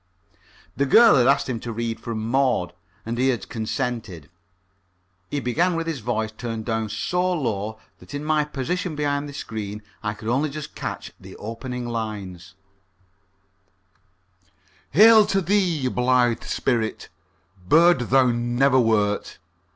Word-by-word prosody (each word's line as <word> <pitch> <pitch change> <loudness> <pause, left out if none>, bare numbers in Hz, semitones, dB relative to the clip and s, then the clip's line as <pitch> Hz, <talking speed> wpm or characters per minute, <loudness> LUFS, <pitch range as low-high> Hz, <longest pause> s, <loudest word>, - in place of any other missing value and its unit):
The 140 +1 0
girl 230 - +7
had 125 -2 +4
asked 140 +1 +3
him 125 -3 -3
to 115 - -6
read 115 0 -3
from 110 -2 -4
"Maud" 125 -7 +1 0.3
and 115 +1 -3
he 130 - +3
had 125 -3 -1
consented. 110 - -4 1.0
He 145 - -2
began 165 +8 +1
with 165 0 -2
his 165 -4 -3
voice 110 -1 -2
turned 115 -1 -5
down 110 -2 -2
so 180 - -1
low 110 - -2 0.2
that - - -10
in 145 +1 -5
my 155 -1 +2
position 150 +4 -3
behind 145 -1 -1
the - - -9
screen 105 -4 -6 0.2
I 105 -1 -3
could 110 - -9
only 135 +6 +1
just 150 +1 -7
catch - - -6
the - - -12
opening 120 +3 -6
lines: 105 -6 -6 2.3
"Hail 220 +1 +7
to 195 - +1
thee, 180 -7 +1
blithe 125 -2 +1
spirit! 115 -4 -1 0.6
Bird 170 - +5
thou 130 0 +5
never 120 +3 +2
wert..." 105 -3 +1
125 Hz, 140 wpm, -23 LUFS, 110-145 Hz, 2.3 s, girl